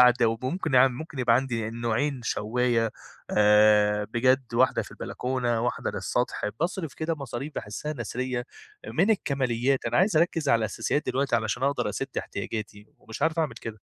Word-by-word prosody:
قعدة، 125 -1 +6
وممكن 130 +7 -2
يع 130 +1 +7
ممكن 140 +2 -8
يبقى 120 -2 +4
عندي 115 -4 -2
نوعين 120 +4 -1
شوّاية 115 +1 +1 0.4
آآ، 105 0 +5
بجد 125 +2 +1
واحدة 130 +2 +3
في - - -12
البلكونة 125 -2 -2
واحدة 120 +1 -1
للسطح، - - -2 0.2
باصرف 170 -3 -2
كده 160 +1 -2
مصاريف 140 0 -6
باحسها 130 +9 -4
نثرية 125 0 -3 0.4
من 185 +7 +2
الكماليات، 135 - +1
أنا - - 0
عايز 190 -2 +3
أركز 165 -2 +2
على 115 - +5
الأساسيات 115 +7 -1
دلوقتي 135 -2 +1
علشان 115 +3 -2
أقدر 140 +1 +1
أسد 135 - -3
احتياجاتي 105 0 -5
ومش 110 0 -8
عارف 160 +1 +1
أعمل 155 -7 0
كده. 115 -1 -8
125 Hz, 155 wpm, -26 LUFS, 115-140 Hz, 0.4 s, يع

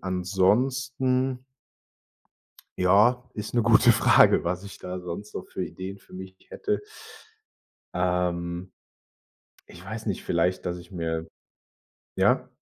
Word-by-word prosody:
Ansonsten 125 +8 0 1.3
Ja, 105 +7 +4
ist 105 +2 -6
'ne 120 - +3
gute 115 +1 +6
Frage, 115 - +5
was 90 +2 -2
ich 100 - -10
da 90 0 -6
sonst 90 +4 -7
so - - -6
für - - -4
Ideen 95 +1 -7
für - - -22
mich 95 0 -9 0.2
hätte. 420 0 -2 1.1
Ähm, 90 0 -1 1.0
ich 90 +2 -13
weiß 110 +2 -6
nicht, 100 - -2
vielleicht, 90 +2 0
dass 90 0 -3
ich 85 +2 -15
mir 80 -2 -3 0.9
ja? - - +2
95 Hz, 120 wpm, -26 LUFS, 90-115 Hz, 1.3 s, gute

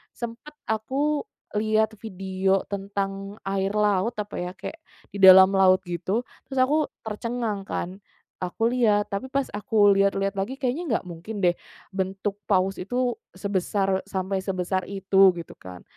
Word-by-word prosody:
sempat 235 +5 -7 0.2
aku 275 +7 0 0.3
lihat 220 0 +1
video 190 -2 -1
tentang 195 0 -3
air 195 +1 -1
laut, 210 +2 +2
apa 210 -1 -5
ya, 180 0 -3
kayak 320 - -7 0.3
di 200 - -7
dalam 190 0 +9
laut 190 -1 +4
gitu, 185 +6 -2 0.2
terus 270 - -7
aku 300 +3 +2 0.2
tercengang 220 -2 -3
kan, 185 +3 -4 0.4
aku 225 +6 -1
lihat, 215 -5 +2
tapi 200 +6 -3
pas 275 0 -2
aku 205 0 +3
lihat-lihat 195 0 +1
lagi, 215 +7 -2
kayaknya 270 +4 -2
nggak - - -2
mungkin 195 +5 -7
deh 175 - +6 0.4
bentuk 195 +1 -3
paus 190 -1 +1
itu 245 +5 -1 0.2
sebesar 195 0 0
sampai 190 0 -2
sebesar 185 -1 -2
itu, 195 -1 +4
gitu 170 -1 -8
kan. 90 -1 -10
200 Hz, 145 wpm, -25 LUFS, 190-220 Hz, 0.4 s, dalam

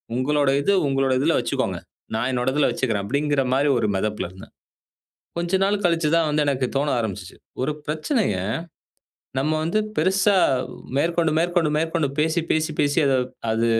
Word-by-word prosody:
உங்களோட 140 +2 +1
இது, 200 +8 +2
உங்களோட 135 -1 +1
இதுல 160 +5 +2
வச்சுக்கோங்க. - - -2 0.4
நா 110 - 0
என்னோட 125 +1 0
இதுல 150 - +3
வச்சுக்குறேன்." 110 -6 -1
அப்படீங்கிற 140 +3 0
மாதிரி 140 +2 +2
ஒரு 110 -3 0
மெதப்புல 105 -2 -2
இருந்தேன். 95 - -14 0.9
கொஞ்ச 175 +2 +1
நாள் 205 0 0
கழிச்சுதான் 165 -1 +2
வந்து 150 0 +1
எனக்கு 135 -2 +1
தோண 145 +2 0
ஆரம்பிச்சிச்சு. 110 -5 -5 0.3
"ஒரு 150 +3 0
பிரச்சனைய 155 - 0 1.0
நம்ம 150 +4 0
வந்து 170 +7 0 0.2
பெருசா, 195 +4 +3 0.6
மேற்கொண்டு 165 +1 +1
மேற்கொண்டு 170 -2 +1
மேற்கொண்டு 160 -2 0
பேசி 160 +3 +2
பேசி 155 0 +1
பேசி 145 +3 +2
அத 135 - +3 0.4
அது 115 +1 +1
150 Hz, 150 wpm, -23 LUFS, 130-165 Hz, 1.0 s, இதுல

